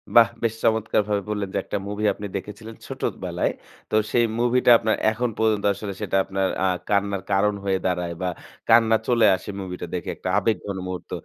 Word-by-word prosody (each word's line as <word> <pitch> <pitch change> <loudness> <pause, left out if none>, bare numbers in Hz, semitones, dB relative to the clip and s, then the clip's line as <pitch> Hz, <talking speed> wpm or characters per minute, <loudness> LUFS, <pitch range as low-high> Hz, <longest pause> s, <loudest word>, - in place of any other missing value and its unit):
বাহ! 115 -1 +8
বেশ 115 -1 +1
চমৎকারভাবে 105 -2 +1
বললেন 105 -2 -2
যে - - 0
একটা - - -3
মুভি 105 +1 -3
আপনি 105 - -6
দেখেছিলেন 105 +3 -9
ছোটবেলায়। - - -2 0.4
তো - - +1 0.2
সেই 120 -1 +4
মুভিটা 120 0 +4
আপনার 110 -1 +1 0.2
এখন 120 +2 -1
পর্যন্ত 110 -2 +2
আসলে 100 0 -6
সেটা - - 0
আপনার 95 0 -1 0.2
আ - - +4 0.2
কান্নার 100 -2 +1
কারণ 100 +2 +3
হয়ে 95 -1 0
দাঁড়ায়, 90 -2 -1
বা 90 - 0 0.4
কান্না 115 -1 +6
চলে 120 -3 +4
আসে 95 - -9
মুভিটা 90 -2 -5
দেখে 85 - -4
একটা - - -5
আবেগঘন 100 -3 -1
মুহূর্ত। 90 -1 -6
105 Hz, 175 wpm, -24 LUFS, 95-110 Hz, 0.4 s, বাহ